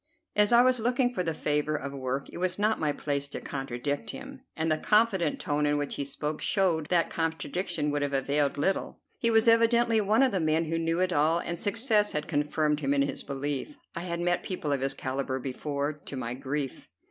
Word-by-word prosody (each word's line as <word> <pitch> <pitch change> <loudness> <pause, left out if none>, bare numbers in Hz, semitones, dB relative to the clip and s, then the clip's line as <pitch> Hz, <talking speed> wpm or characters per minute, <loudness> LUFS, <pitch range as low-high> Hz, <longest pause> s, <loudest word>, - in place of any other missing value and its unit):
As 210 +1 +4
I 240 +1 +7
was 255 -1 +3
looking 245 +2 +1
for 185 - -1
the 170 -2 -1
favor 150 +1 0
of 140 -1 -4
work, 135 0 -3
it - - -6
was 185 0 -1
not 215 +2 +1
my 150 -2 +1
place 140 -1 -2
to 140 - -6
contradict 135 -1 -4
him, - - -8
and 160 0 0
the 155 - +1
confident 210 -7 +2
tone 150 0 0
in 145 0 +2
which 145 -1 -2
he 140 - -3
spoke 150 +2 -4
showed 170 -6 +1
that 170 -1 +2
contradiction 165 -1 -2
would 145 0 -1
have 145 -1 -1
availed 140 +1 +1
little. 190 +7 -1 0.2
He 230 - +2
was 225 0 +4
evidently 230 0 +4
one 215 +5 +3
of 265 - +3
the 195 - 0
men 160 0 +1
who 165 +1 -1
knew 165 +2 0
it 185 -1 +1
all, 155 +2 +3
and 170 0 -3
success 210 0 +2
had 150 0 -2
confirmed 150 0 0
him 140 -1 +1
in 140 - +3
his 140 - -3
belief. 145 - -4 0.2
I - - -2
had 170 -1 -3
met 175 0 +1
people 170 -6 -3
of 140 -2 0
his 135 0 0
calibre 130 0 -2
before, 140 +3 -3
to 145 -2 -9
my 120 -1 -3
grief. 135 +1 -4
155 Hz, 220 wpm, -28 LUFS, 140-190 Hz, 0.2 s, I